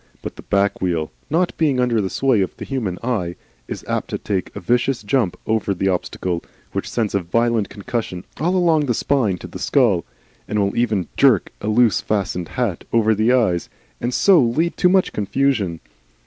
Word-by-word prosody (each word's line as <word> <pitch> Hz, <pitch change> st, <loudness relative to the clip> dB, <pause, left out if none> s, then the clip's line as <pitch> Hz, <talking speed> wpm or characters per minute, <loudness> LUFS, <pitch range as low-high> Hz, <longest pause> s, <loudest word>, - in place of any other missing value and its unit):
But -, -, -6 dB
the -, -, -10 dB
back 100 Hz, 0 st, 0 dB
wheel, 85 Hz, -4 st, -1 dB, 0.2 s
not 175 Hz, +4 st, +1 dB
being 145 Hz, -5 st, +2 dB
under 120 Hz, -3 st, +2 dB
the 95 Hz, -, -2 dB
sway 120 Hz, +3 st, +2 dB
of 95 Hz, -, -3 dB
the -, -, -6 dB
human 110 Hz, -10 st, -2 dB
eye, 100 Hz, -9 st, -1 dB, 0.3 s
is -, -, -6 dB
apt -, -, -2 dB
to -, -, -2 dB
take 95 Hz, -3 st, -2 dB
a -, -, -4 dB
vicious 125 Hz, 0 st, +1 dB
jump 105 Hz, -3 st, +1 dB
over 110 Hz, -3 st, 0 dB
the 95 Hz, +2 st, 0 dB
obstacle, 90 Hz, -1 st, -2 dB, 0.3 s
which -, -, -3 dB
sends 110 Hz, -4 st, -1 dB
a 100 Hz, -, +2 dB
violent 115 Hz, +3 st, +1 dB
concussion 100 Hz, -3 st, -4 dB, 0.2 s
all 175 Hz, +5 st, +1 dB
along 165 Hz, -5 st, +3 dB
the 120 Hz, -, +1 dB
spine 115 Hz, -10 st, +1 dB
to -, -, -9 dB
the -, -, -9 dB
skull, 115 Hz, -11 st, +2 dB, 0.4 s
and 105 Hz, -, -2 dB
will 100 Hz, -1 st, +1 dB
even 110 Hz, -7 st, +1 dB
jerk 130 Hz, -9 st, +4 dB
a -, -, -4 dB
loosely 110 Hz, 0 st, +3 dB
fastened 95 Hz, -4 st, -1 dB
hat 120 Hz, -9 st, -2 dB
over 110 Hz, -1 st, +3 dB
the 110 Hz, +3 st, +2 dB
eyes, 110 Hz, -9 st, +2 dB, 0.3 s
and 120 Hz, -, -1 dB
so 185 Hz, +7 st, +5 dB
lead 150 Hz, +8 st, +1 dB
to 180 Hz, -, +4 dB
much 190 Hz, 0 st, +3 dB
confusion. 105 Hz, -5 st, 0 dB
110 Hz, 190 wpm, -21 LUFS, 95-130 Hz, 0.4 s, so